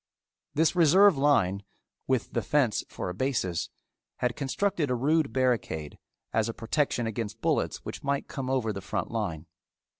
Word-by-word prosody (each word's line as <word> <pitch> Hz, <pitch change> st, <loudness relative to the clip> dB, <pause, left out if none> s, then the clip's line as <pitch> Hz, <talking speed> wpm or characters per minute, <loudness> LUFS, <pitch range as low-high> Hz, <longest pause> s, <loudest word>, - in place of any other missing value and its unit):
This 160 Hz, +4 st, +3 dB
reserve 180 Hz, +3 st, +6 dB
line, 115 Hz, -9 st, +2 dB, 0.5 s
with 130 Hz, -2 st, 0 dB
the 120 Hz, -, +1 dB
fence 120 Hz, 0 st, +1 dB
for -, -, -5 dB
a -, -, -4 dB
basis, 95 Hz, -7 st, -1 dB, 0.5 s
had 125 Hz, -1 st, -1 dB
constructed 160 Hz, +3 st, -1 dB
a 125 Hz, -, +1 dB
rude 150 Hz, +4 st, +2 dB
barricade 120 Hz, -, -1 dB, 0.3 s
as 110 Hz, 0 st, +1 dB
a 115 Hz, -, -5 dB
protection 120 Hz, 0 st, 0 dB
against 110 Hz, 0 st, -4 dB
bullets -, -, 0 dB
which -, -, -6 dB
might 140 Hz, 0 st, -1 dB
come 130 Hz, -2 st, -4 dB
over 125 Hz, -5 st, 0 dB
the 100 Hz, -, -6 dB
front 100 Hz, -, -3 dB
line. 95 Hz, -9 st, -3 dB
125 Hz, 155 wpm, -28 LUFS, 110-145 Hz, 0.5 s, reserve